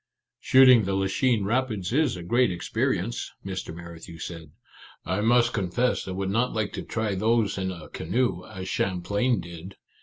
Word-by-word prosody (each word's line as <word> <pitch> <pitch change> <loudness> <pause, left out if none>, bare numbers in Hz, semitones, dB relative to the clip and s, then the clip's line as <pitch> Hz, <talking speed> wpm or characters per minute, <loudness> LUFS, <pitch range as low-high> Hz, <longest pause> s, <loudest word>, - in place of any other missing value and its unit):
" - - -62
Shooting 130 -4 +6
the 95 0 -1
Lachine 100 +4 +1
Rapids 110 -3 -1
is 145 - +2
a 85 - -7
great 120 +5 +2
experience," 115 +4 -2 0.2
Mr. 95 -3 -5
Merrithew 85 0 -10
said. 80 -3 -7 0.3
" - - -21
I 95 +3 -1
must 120 +2 +3
confess 105 +5 0
I - - -4
would 95 +1 -2
not 115 +4 +1
like 110 -2 -2
to - - -4
try 110 -3 -2
those 110 +1 +1
in 95 -1 -2
a 85 -4 -9
canoe, 110 0 -1
as 95 0 -7
Champlain 100 +6 0
did 85 +2 -10
100 Hz, 175 wpm, -26 LUFS, 90-120 Hz, 0.3 s, Shooting